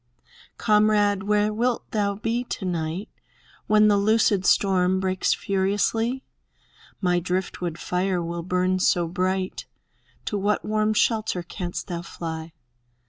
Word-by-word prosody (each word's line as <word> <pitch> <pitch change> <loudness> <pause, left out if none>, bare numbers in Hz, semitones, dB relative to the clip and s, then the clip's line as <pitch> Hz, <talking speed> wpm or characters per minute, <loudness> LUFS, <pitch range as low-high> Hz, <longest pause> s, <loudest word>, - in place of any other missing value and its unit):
Comrade, 210 -2 +3
where 210 +1 +1
wilt 240 +2 -1
thou 200 -2 0
be 230 +3 -1
to 205 - -5
night 170 +2 -3 0.6
When 215 0 +5
the 205 -1 +4
loosed 205 -2 +2
storm 185 -1 +3
breaks 185 0 +1
furiously? 205 +6 0 0.8
My 180 -2 +2
driftwood 180 -1 -3
fire 180 +2 -1
will 170 0 -4
burn 185 +1 0
so 175 -2 +2
bright! 185 +1 -2 0.6
To 205 - -2
what 205 +1 0
warm 215 0 +1
shelter 215 -6 +1
canst 175 0 -5
thou 170 -3 -4
fly? 165 -1 -6
190 Hz, 125 wpm, -24 LUFS, 180-210 Hz, 0.8 s, When